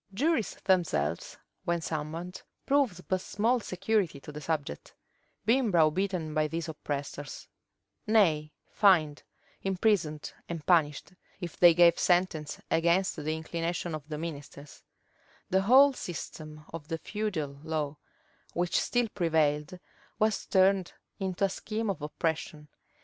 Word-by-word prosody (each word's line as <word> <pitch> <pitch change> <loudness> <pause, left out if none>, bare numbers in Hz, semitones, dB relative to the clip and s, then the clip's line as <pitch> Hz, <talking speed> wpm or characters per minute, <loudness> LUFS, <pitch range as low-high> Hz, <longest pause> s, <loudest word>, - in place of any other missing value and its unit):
Juries 285 -2 +1
themselves, 165 - 0 0.3
when 170 0 0
summoned, 160 +3 -5 0.2
proved 260 -11 +1
but 185 -1 0
small 230 +7 +1
security 190 -5 -1
to 150 - -9
the 150 +1 -8
subject; 145 - -4 0.5
being 240 +1 +3
browbeaten 170 -1 +1
by 155 -1 +2
these 165 +2 -4
oppressors; 145 -2 -5 0.6
nay, 165 -9 +3 0.2
fined, 165 -8 +4 0.4
imprisoned, 185 -6 0 0.2
and 165 -3 -5
punished, 160 -1 +2 0.3
if 175 -3 -6
they 175 -2 +7
gave 170 -1 +6
sentence 175 -4 +1
against 170 +4 +2
the 155 +1 -2
inclination 165 +1 -3
of 155 -1 -7
the 150 - -4
ministers 145 -3 -8 0.7
The 190 +1 +4
whole 265 +7 +7
system 155 -6 -7
of 160 -3 -7
the 165 0 -2
feudal 160 -9 -3
law, 155 -2 -2 0.6
which 175 0 +1
still 245 -1 +1
prevailed, 160 -2 +1 0.4
was 215 -1 +1
turned 190 -1 +3 0.3
into 190 0 0
a - - 0
scheme 215 +2 -3
of 170 -6 -7
oppression. 150 0 -3
170 Hz, 125 wpm, -29 LUFS, 155-195 Hz, 0.7 s, they